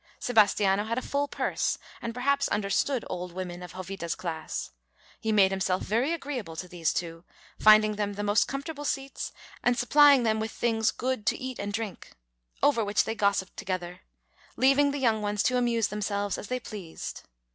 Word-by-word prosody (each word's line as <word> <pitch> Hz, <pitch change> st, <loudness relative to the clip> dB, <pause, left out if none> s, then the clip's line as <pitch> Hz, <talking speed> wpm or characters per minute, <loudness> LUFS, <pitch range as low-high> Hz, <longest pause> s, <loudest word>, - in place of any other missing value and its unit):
Sebastiano 205 Hz, -3 st, +3 dB
had 230 Hz, +2 st, -2 dB
a -, -, 0 dB
full 285 Hz, 0 st, -1 dB
purse, -, -, -1 dB, 0.2 s
and 230 Hz, -, -3 dB
perhaps 280 Hz, +3 st, +1 dB
understood 210 Hz, +5 st, 0 dB
old 180 Hz, -1 st, -5 dB
women 180 Hz, -1 st, -5 dB
of 180 Hz, -1 st, -9 dB
Jovita's 185 Hz, -2 st, -4 dB
class. 160 Hz, -3 st, -5 dB, 0.5 s
He 220 Hz, -, -1 dB
made 195 Hz, -3 st, +5 dB
himself 190 Hz, -1 st, 0 dB
very 235 Hz, -, +1 dB
agreeable 270 Hz, -, -4 dB
to 180 Hz, -, -6 dB
these 170 Hz, -3 st, -1 dB
two, 165 Hz, -1 st, -4 dB, 0.4 s
finding 215 Hz, 0 st, +6 dB
them 205 Hz, -1 st, -1 dB
the 205 Hz, +1 st, -4 dB
most 205 Hz, +1 st, +3 dB
comfortable 285 Hz, +2 st, -5 dB
seats 275 Hz, -1 st, -3 dB, 0.3 s
and 245 Hz, 0 st, +2 dB
supplying 280 Hz, 0 st, +6 dB
them 220 Hz, -1 st, +1 dB
with 220 Hz, +1 st, -2 dB
things 225 Hz, -1 st, +1 dB
good 255 Hz, -4 st, -3 dB
to -, -, +2 dB
eat 260 Hz, -1 st, -6 dB
and 200 Hz, 0 st, -3 dB
drink, 215 Hz, -2 st, -5 dB, 0.5 s
over 235 Hz, -6 st, +4 dB
which 205 Hz, 0 st, +2 dB
they -, -, -2 dB
gossiped 200 Hz, -3 st, 0 dB
together, 185 Hz, -3 st, -4 dB, 0.5 s
leaving 275 Hz, +2 st, +4 dB
the 285 Hz, -, -2 dB
young 225 Hz, -5 st, +2 dB
ones 205 Hz, 0 st, 0 dB
to 255 Hz, -, +2 dB
amuse 235 Hz, -3 st, +1 dB
themselves 205 Hz, -1 st, -2 dB
as -, -, -7 dB
they 255 Hz, +3 st, -2 dB
pleased. 200 Hz, -8 st, -7 dB
215 Hz, 180 wpm, -28 LUFS, 195-250 Hz, 0.5 s, finding